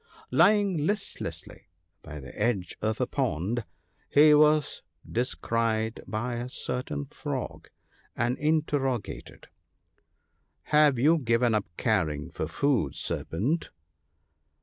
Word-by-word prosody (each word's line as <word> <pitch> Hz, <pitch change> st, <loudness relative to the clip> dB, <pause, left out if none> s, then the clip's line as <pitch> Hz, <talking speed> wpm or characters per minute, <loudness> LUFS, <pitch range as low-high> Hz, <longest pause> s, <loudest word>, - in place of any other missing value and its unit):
Lying 200 Hz, -7 st, +4 dB
listlessly 205 Hz, 0 st, -4 dB, 0.3 s
by 75 Hz, -2 st, -8 dB
the 65 Hz, -, -11 dB
edge 105 Hz, -4 st, -1 dB
of 110 Hz, 0 st, -1 dB
a 125 Hz, -, +2 dB
pond, 115 Hz, -, -1 dB, 0.4 s
he 150 Hz, +1 st, +7 dB
was 150 Hz, -1 st, +4 dB, 0.3 s
descried 115 Hz, -2 st, -1 dB
by 120 Hz, +2 st, -3 dB
a 120 Hz, +1 st, -4 dB
certain 75 Hz, -, -3 dB
Frog, -, -, -6 dB, 0.5 s
and 120 Hz, +2 st, 0 dB
interrogated, 145 Hz, -6 st, -1 dB, 0.4 s
— -, -, -45 dB
" -, -, -47 dB
Have 150 Hz, -3 st, +6 dB
you 155 Hz, +7 st, +4 dB
given 115 Hz, -2 st, +2 dB
up 105 Hz, -5 st, 0 dB
caring 80 Hz, -10 st, 0 dB
for -, -, -3 dB
food, 125 Hz, -, 0 dB
Serpent 130 Hz, -, -2 dB
120 Hz, 110 wpm, -28 LUFS, 110-150 Hz, 0.5 s, he